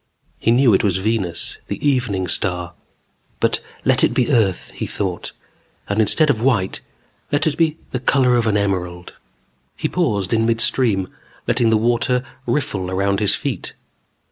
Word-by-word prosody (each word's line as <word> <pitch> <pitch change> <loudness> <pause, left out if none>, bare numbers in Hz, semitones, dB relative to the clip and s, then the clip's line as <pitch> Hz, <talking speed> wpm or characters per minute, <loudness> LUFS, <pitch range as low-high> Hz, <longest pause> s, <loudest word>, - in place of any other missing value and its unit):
He - - 0
knew 120 -1 +5
it 95 - +3
was 95 -3 +2
Venus, 95 -3 -1
the - - -4
Evening 120 -9 0
Star. 90 -2 -1 0.7
But - - +1 0.2
let - - +4
it - - +2
be 125 +3 +1
Earth, 105 -8 +1
he - - -5
thought. 95 -4 -3 0.6
And 100 +2 +1
instead 150 +7 +3
of 110 - -3
white, 115 -7 +1 0.5
let 145 +2 +1
it 155 -3 +1
be 160 -1 +1
the 125 - -2
color 125 -1 +3
of 115 -2 +1
an 105 -1 +2
emerald. 90 -3 -2 0.6
He - - -1
paused 110 - -1
in 115 0 +2
midstream, 115 -4 +1 0.4
letting 120 -2 +2
the 110 - +4
warm 115 +2 +1
water 125 +2 0 0.2
riffle 95 -10 -1
around 100 +1 0
his 105 - +2
feet. - - -4
110 Hz, 165 wpm, -20 LUFS, 95-125 Hz, 0.7 s, knew